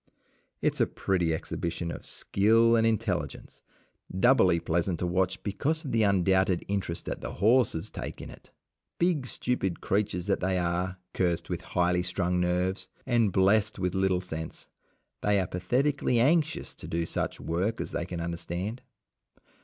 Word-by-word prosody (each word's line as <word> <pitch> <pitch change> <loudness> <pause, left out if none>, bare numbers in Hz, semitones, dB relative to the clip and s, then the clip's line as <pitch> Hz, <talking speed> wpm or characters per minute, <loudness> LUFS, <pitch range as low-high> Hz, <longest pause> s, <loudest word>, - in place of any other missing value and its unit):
It - - +3
is - - -2
a - - +4
pretty 90 -4 0
exhibition 85 +1 -3
of - - -7
skill 115 +3 +3
and 115 0 +3
intelligence, 110 -2 -2 0.6
doubly 95 -7 +5
pleasant 85 +2 0
to 90 - -2
watch 95 +1 0
because 150 - -1
of 135 - -3
the 115 - +2
undoubted 95 -2 +2
interest 95 -4 -3
that - - -4
the - - -5
horses 105 -3 +2
take - - -6
in - - -8
it. - - -15 0.5
Big, 170 -7 +1
stupid 105 -9 -2
creatures 100 -3 -1
that 100 - +1
they 95 0 0
are, 90 +1 -1 0.2
cursed 85 -3 0
with - - -2
highly 90 0 +1
strung 90 0 0
nerves, 90 +2 0 0.2
and 120 -5 +2
blessed 100 +3 +3
with 90 -2 -1
little 95 -1 +1
sense, 80 -3 -6 0.5
they 105 -1 +3
are 95 - 0
pathetically 125 +8 +1
anxious 160 +5 +2
to - - -11
do 85 0 -1
such - - -3
work 95 +7 -1
as - - -3
they 85 - -3
can 90 -2 -5
understand. 85 +7 -3
95 Hz, 160 wpm, -28 LUFS, 90-110 Hz, 0.6 s, doubly